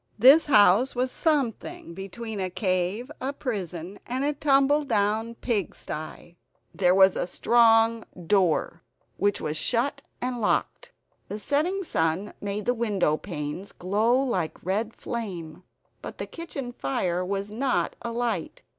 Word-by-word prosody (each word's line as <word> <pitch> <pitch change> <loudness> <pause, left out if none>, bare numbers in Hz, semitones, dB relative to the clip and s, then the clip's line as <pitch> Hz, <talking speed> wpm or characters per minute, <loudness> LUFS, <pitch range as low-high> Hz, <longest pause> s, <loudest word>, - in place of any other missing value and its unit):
This 270 +9 +7
house 210 +1 +5
was 255 +1 0
something 270 - -1
between 205 +4 -6
a 185 -1 -1
cave, 185 +6 -1
a 265 +2 -1
prison, 190 - -5
and 255 +2 -2
a 295 +1 +1
tumbledown 270 -6 +2
pigsty. 175 -6 -4 0.4
There 180 -1 +3
was 190 -1 +6
a - - -1
strong 225 +1 +4 0.2
door, 175 -3 +1 0.4
which 205 +1 +1
was 150 +1 -2
shut 255 - 0 0.2
and 245 -1 -3
locked. - - 0 0.4
The 205 - -5
setting 315 - 0
sun 165 - -1
made 205 0 -3
the 245 - +2
window 205 -9 +1
panes 165 +2 -6
glow 215 +7 +1
like 190 -15 -2
red 210 +5 -1
flame; 180 -9 -6 0.4
but - - -8
the - - -4
kitchen 285 -7 -7
fire 175 - -1
was 200 +2 -3
not 255 +4 0
alight. 235 - -3
215 Hz, 130 wpm, -26 LUFS, 185-250 Hz, 0.4 s, This